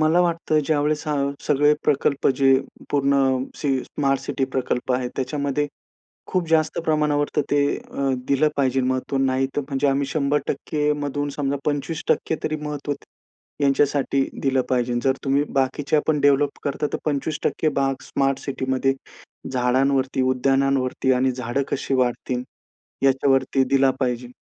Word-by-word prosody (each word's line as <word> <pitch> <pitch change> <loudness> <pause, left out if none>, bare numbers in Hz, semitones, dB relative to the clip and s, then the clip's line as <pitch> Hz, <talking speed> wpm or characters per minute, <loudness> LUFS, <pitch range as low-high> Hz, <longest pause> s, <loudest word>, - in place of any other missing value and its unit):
मला 155 +3 +4
वाटतं 165 -3 +1
ज्यावेळेस 150 0 0
हा 150 - +1 0.3
सगळे 145 0 +4
प्रकल्प 140 -1 +1
जे 135 -1 +5 0.4
पूर्ण 140 -1 +2 0.4
सी 135 -2 0
स्मार्ट 135 -2 0
सिटी 135 - -2
प्रकल्प 130 -1 -2
आहेत, 125 -1 -1
त्याच्यामध्ये 140 +2 -1 0.6
खूप 180 -3 -1
जास्त 160 -1 +2
प्रमाणावर 150 -2 +2
तर 150 - +3
ते 145 - +4 0.2
अ, 140 -1 -3 0.2
दिलं 140 +2 +3
पाहिजे 135 -1 +2
महत्त्व. 130 +1 -1
नाही 135 0 +1
तर 145 - +1
म्हणजे 140 0 0
आम्ही 140 0 +1
100% 150 +1 0
मधून 145 +1 -2
समजा 140 -1 -1
25% 150 +2 -1
तरी 155 - 0
महत्त्व 145 -1 -3
त 140 - -16 0.6
यांच्यासाठी 140 0 +2 0.2
दिलं 135 -1 +2
पाहिजे. 125 -1 +1
जर 135 - +3
तुम्ही 140 +1 +2 0.2
बाकीच्यापण 145 +3 +1
डेव्हलप 145 0 +3
करता, 145 +1 -1
तर - - +1
25% 155 +1 0
भाग 135 0 +1
स्मार्ट 135 0 0
सिटीमध्ये 130 -1 -1 0.6
झाडांवरती, 130 +1 +1
उद्यानांवरती 130 0 +1
आणि 130 +1 +2
झाडं 125 +2 -2
कशी 135 - -2
वाढतील 125 0 0 0.6
याच्यावरती 135 0 +3
दिला 135 -1 +4
पाहिजे, 125 -1 -1
140 Hz, 140 wpm, -23 LUFS, 130-145 Hz, 0.6 s, जे